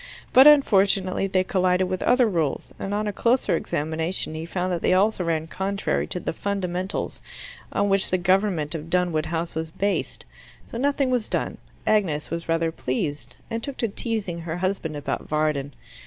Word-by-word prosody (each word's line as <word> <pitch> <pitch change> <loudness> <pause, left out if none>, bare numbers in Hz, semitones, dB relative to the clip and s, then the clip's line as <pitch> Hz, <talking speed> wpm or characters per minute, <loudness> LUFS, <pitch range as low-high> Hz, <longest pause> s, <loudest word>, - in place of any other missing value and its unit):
But 265 +3 +9
unfortunately 195 -9 +4
they 185 -1 +2
collided 185 0 +2
with 185 0 -3
other 250 0 +4
rules, 165 -8 -1
and 195 - -4
on 210 +1 0
a 205 - -2
closer 240 +5 +2
examination 160 +3 -2
he 160 +1 -5
found 180 +1 -1
that 170 - -2
they 185 - +3
also 200 0 +2
ran 160 -2 0
contrary 195 +4 -2
to 180 - -4
the - - -3
fundamentals 190 0 -3 0.5
on 200 - +1
which 195 -1 +3
the 185 - +2
government 185 -4 +1
of 160 0 -6
Dunwood 175 -3 +1
House 165 0 -2
was 160 0 -3
based. 200 +5 -2 0.5
So 230 - -4
nothing 275 -1 +1
was 245 -4 0
done. - - -2 0.3
Agnes 170 -10 +1
was 170 0 -4
rather 165 0 +1
pleased, 130 -3 -3 0.2
and 230 0 -2
took 275 +2 -6
to 230 - 0
teasing 210 -5 -3
her 165 0 -4
husband 180 -4 -2
about 145 - -4
Varden. 150 -2 0
185 Hz, 175 wpm, -24 LUFS, 160-200 Hz, 0.5 s, But